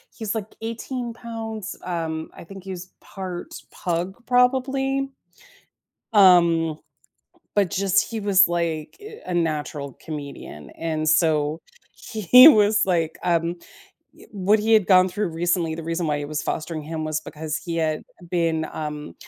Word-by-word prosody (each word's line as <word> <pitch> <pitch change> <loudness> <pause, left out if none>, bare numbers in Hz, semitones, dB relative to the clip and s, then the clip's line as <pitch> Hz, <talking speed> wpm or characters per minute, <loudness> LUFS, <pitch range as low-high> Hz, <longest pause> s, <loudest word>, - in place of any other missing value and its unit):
he's, 220 -1 -3
like, 215 -1 -5
18 235 +1 -5
pounds, 225 -3 -6
um, 165 -3 -3
I - - -10
think 195 +2 -11
he's 185 -1 -8
part 185 -3 -7 0.2
pug, 180 +6 -3
probably, 270 +2 +1 1.1
um, 170 -5 +5 0.8
but 200 -4 +3
just 195 0 +1
he 225 - -3
was, 200 -2 +5
like, 165 - -2
eh, 435 +1 -11
a 180 - -4
natural 150 -4 -2
comedian, 140 - -8
and, 155 -1 -3
so 155 -1 +2 0.3
he 250 - +6
was, 210 -3 +4
like, 165 -4 0
um 170 0 +1 0.7
eh, - - -15
what 205 +2 +2
he 225 +1 +1
had 215 -4 +4
gone 185 -1 +6
through 200 +1 -2
recently, 170 0 0
the 165 - -6
reason 165 +1 -2
why 150 -1 0
he 145 - -4
was 150 0 -3
fostering 155 -1 -3
him 155 +1 -5
was 155 0 -2
because 155 0 -5
he 170 -1 -5
had 155 -1 -1 0.3
been, 165 -3 0
um 150 -1 -6
175 Hz, 145 wpm, -23 LUFS, 160-210 Hz, 1.1 s, he